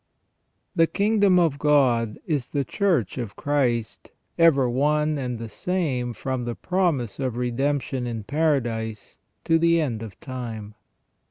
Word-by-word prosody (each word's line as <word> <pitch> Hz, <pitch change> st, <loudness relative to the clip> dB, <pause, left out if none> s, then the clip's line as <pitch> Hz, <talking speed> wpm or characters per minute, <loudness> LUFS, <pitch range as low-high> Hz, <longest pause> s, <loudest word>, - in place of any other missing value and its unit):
The 165 Hz, -2 st, +4 dB
kingdom 200 Hz, -1 st, +3 dB
of 160 Hz, -5 st, +2 dB
God 125 Hz, -7 st, +3 dB
is 145 Hz, -6 st, -1 dB
the 140 Hz, -2 st, -2 dB
Church 170 Hz, -, 0 dB
of 115 Hz, -5 st, -5 dB
Christ, 125 Hz, -6 st, -1 dB, 0.3 s
ever 150 Hz, -6 st, +5 dB
one 150 Hz, +4 st, +1 dB
and 125 Hz, -2 st, -3 dB
the 115 Hz, 0 st, -6 dB
same 130 Hz, -, -2 dB
from 130 Hz, 0 st, -3 dB
the 120 Hz, -1 st, -3 dB
promise 170 Hz, -, -1 dB
of 130 Hz, -3 st, -2 dB
redemption 130 Hz, +1 st, -1 dB
in 115 Hz, -3 st, -4 dB
Paradise 120 Hz, -6 st, -1 dB, 0.2 s
to 165 Hz, 0 st, +3 dB
the 170 Hz, 0 st, +4 dB
end 120 Hz, -8 st, -1 dB
of 110 Hz, -3 st, -9 dB
time. 115 Hz, -5 st, -6 dB
135 Hz, 140 wpm, -24 LUFS, 120-155 Hz, 0.3 s, ever